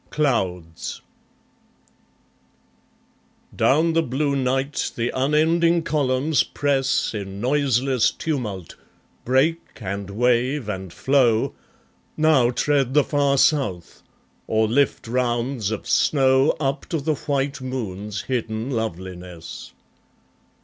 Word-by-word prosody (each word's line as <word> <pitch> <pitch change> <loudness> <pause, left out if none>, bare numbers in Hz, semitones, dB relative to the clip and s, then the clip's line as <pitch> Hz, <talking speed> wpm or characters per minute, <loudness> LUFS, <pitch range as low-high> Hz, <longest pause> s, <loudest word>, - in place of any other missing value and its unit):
Clouds 95 - -2 2.6
Down 160 +4 +3
the 165 - +3
blue 140 0 -1
night 135 +1 -1
the 120 +1 -1
unending 160 +5 +2
columns 145 0 +1
press 135 -4 0
In 100 -2 -6
noiseless 130 -1 +2
tumult, 110 - -4 0.5
break 140 +7 +2 0.2
and 100 -2 -5
wave 125 +4 +1
and 95 -3 -5
flow, 125 -3 +2 0.6
Now 155 -6 +4
tread 135 +1 0
the 150 - +6
far 140 -1 +1
South, 130 - +1 0.5
or 110 0 +2
lift 125 +1 +1
rounds 120 -2 -1
of 110 -2 -4
snow 135 -1 +3
Up 135 -1 -2
to 165 - -2
the 155 +2 0
white 140 -2 -2
moon's 105 -6 -4
hidden 115 -1 -3
loveliness. 90 -6 -6
130 Hz, 100 wpm, -22 LUFS, 110-145 Hz, 2.6 s, the